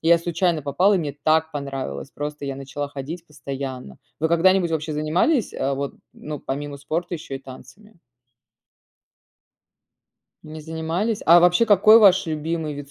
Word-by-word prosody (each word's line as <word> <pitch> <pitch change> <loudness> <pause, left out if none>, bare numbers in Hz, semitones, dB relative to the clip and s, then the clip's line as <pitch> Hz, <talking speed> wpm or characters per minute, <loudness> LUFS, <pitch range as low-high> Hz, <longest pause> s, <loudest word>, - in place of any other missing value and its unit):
и 165 - -1
я 170 - +7
случайно 170 -1 -1
попала. 175 +9 +2
И 190 - +2
мне 145 -4 -4
так 160 +1 +2
понравилось, 135 - -5
просто 145 0 -6
я 135 -1 -4
начала 140 +1 -5
ходить 145 +5 -7
постоянно. 135 - -7 0.2
Вы 160 +1 0
когда-нибудь 175 +1 +3
вообще 155 -1 -2
занимались, 175 - +1
э, 140 - -2
вот 140 +1 -4 0.2
ну 150 -2 -7
помимо 145 +1 -5
спорта 165 +5 -4
еще 150 -4 -6
и - - -9
танцами? 200 +12 -14 2.5
Не 155 0 -9
занимались? 165 +7 -3
А 170 +2 +8
вообще, 180 +5 +4
какой 215 +2 +7
ваш 190 -4 +5
любимый 155 0 -3
вид 140 0 -9
155 Hz, 155 wpm, -22 LUFS, 140-175 Hz, 2.5 s, А